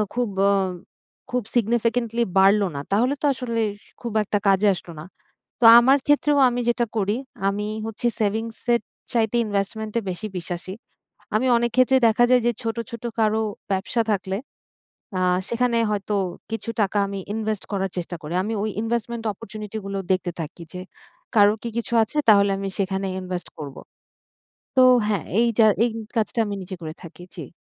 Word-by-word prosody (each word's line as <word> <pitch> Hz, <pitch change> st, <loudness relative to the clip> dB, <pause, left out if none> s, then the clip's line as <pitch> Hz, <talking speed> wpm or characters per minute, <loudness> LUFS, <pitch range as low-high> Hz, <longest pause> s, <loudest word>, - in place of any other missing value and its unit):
খুব 245 Hz, -2 st, 0 dB, 0.2 s
অ -, -, +4 dB, 0.8 s
খুব 250 Hz, -1 st, 0 dB
significantly 235 Hz, 0 st, +1 dB
বাড়লো 195 Hz, +1 st, +5 dB
না, 140 Hz, -, -3 dB
তাহলে 240 Hz, +7 st, +2 dB
তো -, -, 0 dB
আসলে 240 Hz, -3 st, -3 dB, 0.4 s
খুব 235 Hz, -, -4 dB
একটা 205 Hz, +1 st, -1 dB
কাজে 195 Hz, +1 st, +4 dB
আসলো 175 Hz, -, -10 dB
না। -, -, -9 dB, 0.6 s
তো -, -, +4 dB
আমার 265 Hz, +4 st, +5 dB
ক্ষেত্রেও 290 Hz, 0 st, +3 dB
আমি 245 Hz, 0 st, -2 dB
যেটা 240 Hz, 0 st, +1 dB
করি 205 Hz, +2 st, +1 dB, 0.3 s
আমি 205 Hz, +1 st, -3 dB, 0.2 s
হচ্ছে 225 Hz, +2 st, -2 dB
সেভিংসের 225 Hz, +3 st, 0 dB, 0.3 s
চাইতে 225 Hz, -1 st, +1 dB
ইনভেস্টমেন্টে 215 Hz, +2 st, -2 dB
বেশি 185 Hz, +4 st, -4 dB
বিশ্বাসী। 175 Hz, +1 st, -5 dB, 0.6 s
আমি 240 Hz, +4 st, +1 dB
অনেক 235 Hz, 0 st, +1 dB
ক্ষেত্রে 255 Hz, +1 st, +5 dB
দেখা 225 Hz, +2 st, +3 dB
যায় 250 Hz, -2 st, +5 dB
যে 240 Hz, -, +3 dB
ছোট, 225 Hz, 0 st, -2 dB
ছোট 235 Hz, 0 st, -8 dB, 0.2 s
কারো 220 Hz, 0 st, +2 dB, 0.3 s
ব্যবসা 200 Hz, +5 st, 0 dB
থাকলে 190 Hz, -1 st, -2 dB, 0.8 s
আ -, -, 0 dB, 0.3 s
সেখানে 235 Hz, 0 st, +1 dB
হয়তো 205 Hz, 0 st, -1 dB, 0.3 s
কিছু 225 Hz, +1 st, -4 dB
টাকা 205 Hz, +1 st, 0 dB
আমি 195 Hz, 0 st, -5 dB, 0.2 s
ইনভেস্ট 220 Hz, -2 st, -2 dB
করার 195 Hz, -1 st, -1 dB
চেষ্টা 175 Hz, 0 st, -4 dB
করি 155 Hz, +3 st, -5 dB
আমি 220 Hz, -, -3 dB
ওই 215 Hz, -, -1 dB
investment 235 Hz, 0 st, -2 dB
opportunity 210 Hz, +2 st, -8 dB
গুলো 195 Hz, 0 st, -3 dB
দেখতে 185 Hz, -1 st, 0 dB
থাকি 165 Hz, +2 st, -7 dB
যে, 180 Hz, -, -5 dB, 0.6 s
কারোর 205 Hz, +1 st, +5 dB
কি -, -, -2 dB
কিছু 235 Hz, -, -4 dB
আছে 220 Hz, -, -12 dB
তাহলে 200 Hz, -2 st, +6 dB
আমি 195 Hz, 0 st, -3 dB
সেখানে 195 Hz, 0 st, -1 dB
ইনভেস্ট 180 Hz, -1 st, -5 dB
করব। 145 Hz, -3 st, -7 dB, 1.0 s
তো 260 Hz, -, +8 dB, 0.2 s
হ্যাঁ, 205 Hz, -4 st, -1 dB
এই 235 Hz, -, +4 dB
যা 220 Hz, -, +7 dB, 0.2 s
এই 240 Hz, -, +2 dB, 0.3 s
কাজটা 220 Hz, +1 st, 0 dB
আমি 205 Hz, -, -3 dB
নিজে 185 Hz, +1 st, -7 dB
করে 155 Hz, -1 st, -6 dB
থাকি। 175 Hz, +1 st, -11 dB
জি। -, -, -8 dB
215 Hz, 165 wpm, -23 LUFS, 195-235 Hz, 1.0 s, তো